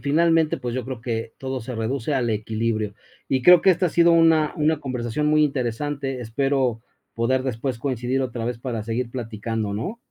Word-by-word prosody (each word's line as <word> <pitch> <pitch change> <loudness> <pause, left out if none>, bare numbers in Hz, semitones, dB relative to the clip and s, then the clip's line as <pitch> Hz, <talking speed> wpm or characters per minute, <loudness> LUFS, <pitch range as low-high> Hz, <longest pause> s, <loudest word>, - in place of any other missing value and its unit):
finalmente, 160 +2 +2
pues 120 -1 -4
yo 130 - -2
creo 130 -3 -6
que 115 -1 -4
todo 130 -1 -4
se 125 +2 -6
reduce 120 +5 -2
al 120 -3 0
equilibrio. 110 0 -2 0.3
Y 130 -1 +1
creo 180 +4 +8
que 190 - +5
esta 180 0 +2
ha - - 0
sido 170 +1 +4
una 165 -2 +4
una 155 0 +1
conversación 130 +1 -2
muy 155 0 +4
interesante. 135 0 -2
Espero 125 0 0 0.3
poder 130 +3 +1
después 130 -1 -3
coincidir 130 +1 -1
otra 120 -3 -4
vez 120 0 -3
para 120 -3 -4
seguir 115 +2 -3
platicando, 110 -3 -4
¿no? 185 - -4
130 Hz, 185 wpm, -23 LUFS, 115-145 Hz, 0.3 s, creo